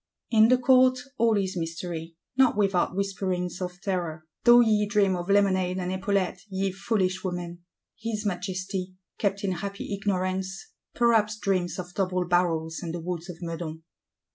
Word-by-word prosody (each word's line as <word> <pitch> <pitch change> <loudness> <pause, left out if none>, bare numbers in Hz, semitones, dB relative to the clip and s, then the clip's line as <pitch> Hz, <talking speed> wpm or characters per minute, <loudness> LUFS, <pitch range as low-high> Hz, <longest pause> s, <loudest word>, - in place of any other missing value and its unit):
In 220 -1 +6
the 255 +2 +5
Court, 255 0 +5 0.2
all 225 -2 +4
is 190 -1 -1
mystery, 165 -1 -5 0.2
not 260 -5 +4
without 195 -3 +2
whisperings 185 -2 -2
of 180 0 -5
terror; 170 -5 -3 0.2
though 240 0 +9
ye 210 -3 +3
dream 200 -2 +3
of 175 +1 -5
lemonade 190 -2 +3
and 180 -1 -2
epaulettes, 190 -1 -1
ye 190 0 -1
foolish 190 -1 -1
women! 175 -2 -4 0.4
His 220 -1 -3
Majesty, 185 0 -3 0.2
kept 200 -1 0
in 195 - 0
happy 200 +3 -4
ignorance, 190 - -2 0.2
perhaps 225 -3 +3
dreams 185 -4 0
of 180 -1 -6
double 185 -2 0
barrels 165 -2 +1
and 170 -1 -4
the - - -4
Woods 175 +1 -5
of 175 - -7
Meudon. 165 -1 -5
185 Hz, 155 wpm, -27 LUFS, 180-205 Hz, 0.4 s, though